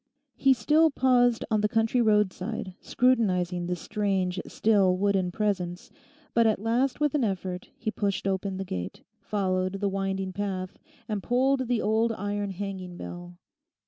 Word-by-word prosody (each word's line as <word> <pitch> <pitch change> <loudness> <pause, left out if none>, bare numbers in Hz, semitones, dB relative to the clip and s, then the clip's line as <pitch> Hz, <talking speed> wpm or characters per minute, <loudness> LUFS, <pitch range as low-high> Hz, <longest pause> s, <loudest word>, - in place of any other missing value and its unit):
He 270 -1 +4
still 305 +8 +4
paused 245 -4 +3
on 215 -1 +3
the 210 - +1
country 225 +2 +2
roadside, 210 -4 0
scrutinising 180 -8 +1
this 180 -1 -3
strange, 190 -3 -1
still, 195 -4 +3
wooden 195 -2 +1
presence; 180 -3 -2 0.4
but 230 -1 +4
at 215 - +2
last 240 +6 0
with 295 -2 +1
an 295 -4 +1
effort 185 -3 -3
he 220 - -3
pushed 200 -3 -2
open 190 0 -1
the 195 - -4
gate, 90 - -5 0.2
followed 185 -2 -1
the 200 0 -1
winding 195 -1 -2
path, 190 -2 -4 0.3
and 210 -2 -2
pulled 260 +3 +1
the 245 -2 0
old 220 +2 +2
iron 205 -1 -3
hanging 190 -2 -6
bell. 175 0 -8
200 Hz, 150 wpm, -27 LUFS, 185-225 Hz, 0.4 s, He